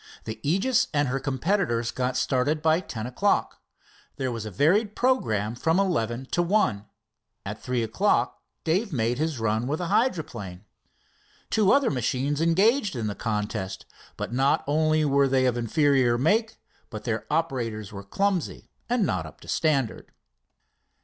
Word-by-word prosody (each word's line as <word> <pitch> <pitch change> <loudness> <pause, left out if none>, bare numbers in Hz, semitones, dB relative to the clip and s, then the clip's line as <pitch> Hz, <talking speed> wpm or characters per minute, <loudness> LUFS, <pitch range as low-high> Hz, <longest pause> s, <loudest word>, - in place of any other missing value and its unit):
The 110 - -6
Aegis 195 - +2
and 145 -2 +2
her 135 +2 -1
competitors 130 - 0
got 130 0 -1
started 140 +4 0
by 160 +1 +4
ten 115 -11 -6
o'clock. 195 +12 0 0.5
There 130 -2 -2
was 115 -2 -5
a - - -4
varied 190 - +2
programme 110 - +1
from 160 +9 +1
eleven 130 - 0
to 175 - +2
one. 170 - +1 0.6
At 105 +2 -6
three 125 -2 -1
o'clock 120 - +1 0.2
Dave 185 +6 0
made 120 -2 0
his 155 -2 -1
run 110 +2 0
with 150 +3 -1
the 175 0 -4
hydroplane. 120 - -1 0.9
Two 210 -2 +3
other 275 -3 +4
machines 135 +3 -1
engaged 200 - +3
in 115 -3 -2
the 105 - -2
contest, 105 -4 -3 0.3
but 105 +2 -4
not 135 +3 +2
only 155 +1 +2
were 140 -1 +3
they 130 -1 +2
of 125 -2 +2
inferior 125 0 +2
make, 220 - +1 0.3
but 105 -4 -7
their 115 -1 -3
operators 120 -10 -2
were 100 - -6
clumsy 185 - -2 0.2
and 240 -4 +2
not - - -1
up - - -14
to - - -14
standard. 140 -8 0
135 Hz, 155 wpm, -26 LUFS, 115-170 Hz, 0.9 s, by